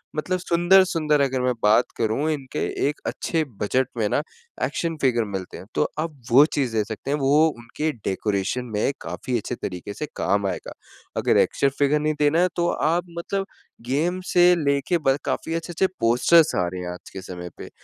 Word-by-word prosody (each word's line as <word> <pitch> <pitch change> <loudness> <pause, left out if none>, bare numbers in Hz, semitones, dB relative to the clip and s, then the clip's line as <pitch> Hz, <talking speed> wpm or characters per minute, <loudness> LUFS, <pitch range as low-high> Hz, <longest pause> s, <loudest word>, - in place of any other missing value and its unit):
मतलब 180 +4 -1
सुंदर-सुंदर 175 -4 +3
अगर 130 -2 +1
मैं 125 0 +1
बात 105 +4 +5
करूँ 115 +7 0
इनके 140 -4 -4 0.3
एक 150 - -3
अच्छे 165 -2 -1 0.2
बजट 125 +5 +1
में 110 - +1
ना 145 - +1 0.4
एक्शन 165 -1 -1
फ़िगर 120 -4 +2
मिलते 95 -2 -5
हैं, - - -10
तो - - +3 0.2
आप 160 -1 -3 0.2
वो 135 +5 +8
चीज़ 130 -5 0
दे 110 - +2
सकते 110 +5 -5
हैं 145 - +1
वो 145 +4 +4
उनके 120 +7 -3
डेकोरेशन 100 +5 -1
में 105 +6 +1
काफ़ी 125 -2 -3
अच्छे 120 +3 -4
तरीके 90 -1 -6
से 150 - -3
काम 100 0 +1
आएगा। 90 - -5 0.4
अगर - - +3
एक्शन 140 - +2
फ़िगर 145 +1 +3
नहीं 155 +1 0
देना 150 +2 +3
है 180 - +4
तो 175 0 +2
आप 170 +3 0
मतलब 195 +3 -2 0.4
गेम 175 +7 0
से 180 0 +6
लेके 140 +5 +1
ब 135 +1 +4
काफ़ी 165 - -2
अच्छे-अच्छे 170 +3 0
पोस्टर्स 125 +8 +4
आ 90 - +1
रहे 90 +1 -5
हैं - - -4
आज 90 - -12
के 95 - -7
समय 90 -1 -7
पे, - - -9
140 Hz, 190 wpm, -23 LUFS, 115-165 Hz, 0.4 s, वो